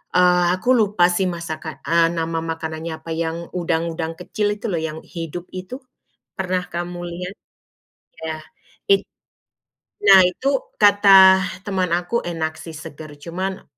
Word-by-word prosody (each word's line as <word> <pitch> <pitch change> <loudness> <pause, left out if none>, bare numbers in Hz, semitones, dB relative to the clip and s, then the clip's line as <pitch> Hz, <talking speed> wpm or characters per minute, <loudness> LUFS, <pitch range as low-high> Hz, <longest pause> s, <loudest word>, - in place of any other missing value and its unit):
eee, 180 0 +5
aku 250 +7 +2
lupa, 205 -6 +3
sih, 185 +2 +1
masakan 160 -4 -6
eee, 165 0 +4
nama 165 -1 -2
makanannya 160 0 -5
apa, 165 +1 -9
yang 165 +1 -3
udang-udang 165 -1 -2
kecil 205 +3 -1
itu 215 +3 -6
loh, 170 - 0
yang 160 0 -4
hidup 170 +1 -7
itu, 185 +8 -7 0.6
pernah 185 -1 -1
kamu 175 +1 -5
lihat? 180 +2 -6 0.9
Ya, 160 -1 -4 0.6
it 395 - +5 1.0
nah, 195 -2 +9
itu 220 +10 -2 0.3
kata 195 -2 +6
teman 190 -4 -1
aku 175 +7 -1
enak, 160 -2 -3
sih, 165 -2 -9
seger, 155 -1 -10
cuman 185 +6 -5
175 Hz, 135 wpm, -21 LUFS, 165-190 Hz, 1.0 s, nah